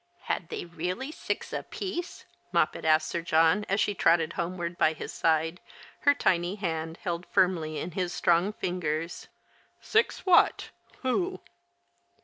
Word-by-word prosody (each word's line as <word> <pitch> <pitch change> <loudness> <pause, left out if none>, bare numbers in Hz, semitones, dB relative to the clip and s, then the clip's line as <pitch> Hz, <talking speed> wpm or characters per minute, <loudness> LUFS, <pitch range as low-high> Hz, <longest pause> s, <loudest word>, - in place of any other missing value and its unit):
"Had 165 - -3
they - - -4
really 180 - -4
six - - -4
aj)iece?" 360 -3 -5 0.3
Moppet - - +1
asked 155 0 +4
Sir 170 - -2
John, 165 +5 +3
as 195 +2 +1
she 205 - +2
trotted 165 -2 +3
homeward 175 -1 -3
by 160 - +3
his 155 - -7
side, 165 +2 +1 0.4
her 285 -1 +4
tiny 175 -5 +1
hand 165 -4 -3
held 175 0 -3
firmly 165 -4 +1
in 180 - -4
his 180 +1 -2
strong 175 +4 +2
fingers. 170 -4 -3 0.3
" - - -35
Six 445 +2 +2
what 365 -2 +4
— - - -28
who 355 +9 0
175 Hz, 145 wpm, -28 LUFS, 165-200 Hz, 0.4 s, asked